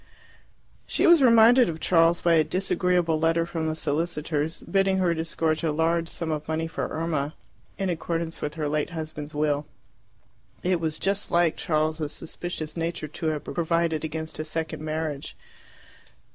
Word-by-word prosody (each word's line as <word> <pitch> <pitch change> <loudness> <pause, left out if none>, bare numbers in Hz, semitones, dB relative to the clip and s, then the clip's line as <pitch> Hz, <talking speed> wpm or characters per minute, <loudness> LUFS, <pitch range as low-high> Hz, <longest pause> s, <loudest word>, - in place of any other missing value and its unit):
She - - +1
was 340 -3 +7
reminded 240 -1 +6
of 160 -1 -5
Charles 165 0 +3
by 170 - +3
a 160 -1 +5
disagreeable 180 -1 +1
letter 165 +1 +2
from 165 -2 -3
the 155 - -1
solicitors, 155 0 -2
bidding 195 -1 +2
her 180 -2 +2
disgorge 160 -1 -1
a 160 - +1
large 165 +2 +1
sum 165 -2 -4
of 150 -1 -3
money 160 +1 -1
for 165 - -3
Irma, 155 -2 -2 0.4
in 195 - -1
accordance 165 -1 -3
with 150 +1 -3
her 155 -2 -2
late 150 0 -1
husband's 155 -3 -6
will. 150 -1 0 1.0
It 180 -1 +1
was 160 -2 -2
just 200 +1 0
like 170 -2 +3
Charles's 155 -1 -1
suspicious 165 -1 -4
nature 165 -1 -3
to 160 +2 -4
have 150 -2 -1
provided 165 -2 0
against 160 0 -5
a - - -1
second 160 0 -4
marriage. 155 -2 -3
160 Hz, 160 wpm, -26 LUFS, 155-170 Hz, 1.0 s, was